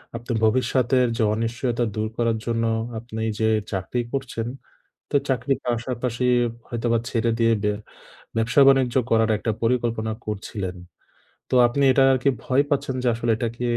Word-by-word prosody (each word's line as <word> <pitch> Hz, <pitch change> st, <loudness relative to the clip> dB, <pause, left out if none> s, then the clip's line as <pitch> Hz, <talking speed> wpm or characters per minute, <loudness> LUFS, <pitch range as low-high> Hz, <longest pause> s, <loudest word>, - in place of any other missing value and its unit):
আপনি 120 Hz, +1 st, -6 dB
ভবিষ্যতের 125 Hz, +2 st, +2 dB
যে -, -, +2 dB
অনিশ্চয়তা 115 Hz, +2 st, -1 dB
দূর 110 Hz, 0 st, -1 dB
করার 115 Hz, -1 st, +1 dB
জন্য 115 Hz, -1 st, 0 dB, 0.4 s
আপনি 110 Hz, -1 st, -7 dB, 0.2 s
যে 110 Hz, -, +2 dB, 0.3 s
চাকরি 95 Hz, +5 st, -2 dB
করছেন, 125 Hz, -4 st, -3 dB, 0.6 s
তো -, -, +2 dB
চাকরির 130 Hz, +1 st, 0 dB
পাশাপাশি 120 Hz, 0 st, -2 dB, 0.4 s
হয়তোবা 115 Hz, 0 st, 0 dB
ছেড়ে 115 Hz, -1 st, +1 dB
দিয়ে 115 Hz, -1 st, +3 dB
বে 105 Hz, -, +1 dB, 0.6 s
ব্যবসা 115 Hz, +5 st, +3 dB
বাণিজ্য 130 Hz, -2 st, +3 dB
করার 110 Hz, 0 st, +3 dB
একটা 110 Hz, +1 st, -1 dB
পরিকল্পনা 115 Hz, -2 st, 0 dB
করছিলেন। 100 Hz, -3 st, -4 dB, 0.7 s
তো -, -, -5 dB
আপনি 140 Hz, +4 st, 0 dB
এটা 135 Hz, +1 st, +4 dB
আর 130 Hz, -, +3 dB
কি 140 Hz, -, +4 dB
ভয় 135 Hz, +2 st, +2 dB
পাচ্ছেন 135 Hz, -3 st, -1 dB
যে, -, -, +1 dB
"আসলে 115 Hz, 0 st, 0 dB
এটা 120 Hz, -, -1 dB
কি 120 Hz, -, -6 dB
120 Hz, 155 wpm, -23 LUFS, 115-125 Hz, 0.7 s, এটা